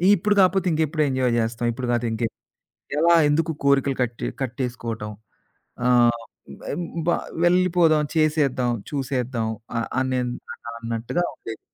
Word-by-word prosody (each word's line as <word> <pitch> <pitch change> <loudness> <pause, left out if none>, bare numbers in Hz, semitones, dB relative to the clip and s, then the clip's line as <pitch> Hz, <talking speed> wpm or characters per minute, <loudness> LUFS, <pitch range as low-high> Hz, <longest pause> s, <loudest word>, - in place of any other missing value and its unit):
ఇప్పుడు 205 +3 +1
కాకపోతే 190 0 +4
ఇంకెప్పుడు 155 0 0
ఎంజాయ్ 130 -2 +1
జేస్తాం? 115 +1 -1
ఇప్పుడు 125 +1 -4
కాతే 120 0 0
ఇంకే 115 +1 -1 0.7
ఎలా 170 +2 +5
ఎందుకు 160 +2 +1
కోరికలు 140 -1 +3
కట్టే 120 -1 -2 0.2
కట్టేసుకోవటం. 120 -4 -4 0.8
ఆహ్, 120 -1 +4 0.8
బా 175 - +3 0.3
వెళ్ళిపోదాం, 175 -3 +4
చేసేద్దాం, 150 -6 +2 0.2
చూసేద్దాం. 130 -5 -2 0.3
ఆ! - - +1 0.2
అనే 130 -1 0
అన్న 120 -1 -7
అన్నట్టుగా 115 +8 -2
ఉండేది. 110 -1 -8
130 Hz, 120 wpm, -23 LUFS, 120-155 Hz, 0.8 s, ఎలా